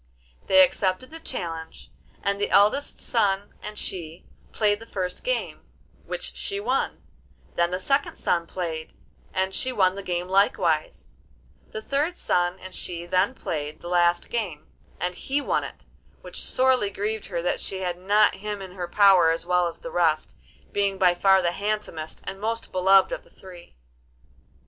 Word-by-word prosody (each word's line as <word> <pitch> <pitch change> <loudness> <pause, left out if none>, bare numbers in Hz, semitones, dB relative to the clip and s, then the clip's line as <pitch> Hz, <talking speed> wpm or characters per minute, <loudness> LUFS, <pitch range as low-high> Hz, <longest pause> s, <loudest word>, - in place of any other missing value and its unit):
They 285 0 +8
accepted 255 -2 0
the 325 - -9
challenge, 165 - -6 0.3
and 200 0 0
the - - +1
eldest 210 +8 +3
son 205 -3 0
and 210 0 -7
she 170 -4 -6 0.3
played 205 -1 +2
the 225 - -12
first 180 -4 -4
game, - - -2 0.4
which - - -4
she 400 0 -3
won; 410 - -1 0.5
then 170 0 +2
the 180 +1 -2
second 275 +8 0
son 170 -1 0
played, 165 -4 -4 0.4
and 190 0 0
she 260 - -1
won 190 -6 +3
that 200 0 -8
game 175 0 -2
likewise; 185 -5 +1 0.6
the 215 - -6
third 295 +8 0
son 175 +1 +1
and 185 0 -10
she 170 -2 -5
then 185 +7 +1
played 150 -6 -4
the 175 - -7
last 175 0 +2
game, 190 -11 -3 0.3
and 180 0 -1
he 275 +9 -2
won 285 - 0
it, - - -9 0.4
which - - -5
sorely 255 -5 +3
grieved 210 +2 -3
her 170 -3 -3
that 175 - 0
she 190 -1 -4
had 180 -1 -2
not 205 +3 +4
him 205 +1 -5
in 190 -1 -8
her 180 -1 -5
power 190 -3 +6
as 165 +1 -1
well 180 0 +2
as 170 - -6
the 250 - -8
rest, 160 -3 +1 0.4
being 200 -1 +1
by 180 -2 +5
far 190 +1 +4
the 170 - +2
handsomest 200 -6 -4
and 195 - -7
most 230 +1 -3
beloved 190 +1 +5
of - - -4
the - - -22
three. 180 -2 -14
190 Hz, 170 wpm, -25 LUFS, 175-210 Hz, 0.6 s, They